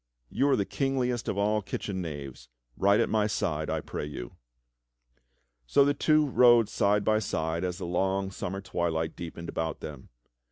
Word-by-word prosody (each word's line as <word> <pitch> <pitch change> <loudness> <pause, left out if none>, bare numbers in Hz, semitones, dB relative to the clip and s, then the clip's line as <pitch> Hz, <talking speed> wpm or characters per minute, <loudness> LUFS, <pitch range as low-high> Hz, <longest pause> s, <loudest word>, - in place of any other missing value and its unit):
You 140 - +2
are 135 - +5
the 100 - 0
kingliest 125 -3 -1
of 100 - -1
all 105 +1 +2
kitchen 95 -1 -4
knaves. 70 -7 -7 0.3
Ride 100 +2 +3
at - - +3
my 105 -1 +1
side, 80 -7 -1
I - - -1
pray - - -5
you." - - -7 1.3
So 140 - +5
the 145 - +3
tw^o 155 +1 +3
rode 120 -3 +6
side 100 0 +2
by 110 0 +3
side 80 -4 -2
as 90 -1 -2
the 90 - -5
long 95 +2 0
summer 95 0 -4
twdlight 80 -4 -2
deepened 85 0 -7
about 80 -1 -3
them. 70 -4 -8
95 Hz, 170 wpm, -28 LUFS, 80-110 Hz, 1.3 s, rode